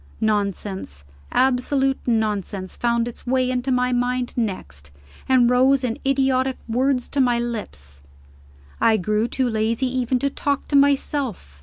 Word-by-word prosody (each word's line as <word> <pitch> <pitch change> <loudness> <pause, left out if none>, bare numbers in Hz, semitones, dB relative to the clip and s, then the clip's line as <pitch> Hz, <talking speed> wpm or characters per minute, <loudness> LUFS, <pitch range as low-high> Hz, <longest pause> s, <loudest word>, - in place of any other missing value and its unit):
Nonsense, 200 - -2 0.3
absolute 265 +1 +1
nonsense, 210 -4 -1
found 235 0 0
its 240 - -10
way 255 0 +1
into 255 +1 -1
my 250 0 +1
mind 245 0 -1
next, 185 - -4 0.4
and 255 -2 +5
rose 260 +2 +4
in 235 -3 -2
idiotic 265 -1 +1
words 250 +2 0
to 280 - +1
my 245 -2 +3
lips. 205 - -5 0.8
I 225 -1 +4
grew 210 +4 0
too 260 +1 -1
lazy 225 +2 0
even 255 0 +1
to 280 +2 -1
talk 285 0 -2
to 285 - 0
myself. 275 - +1
245 Hz, 140 wpm, -22 LUFS, 215-260 Hz, 0.8 s, and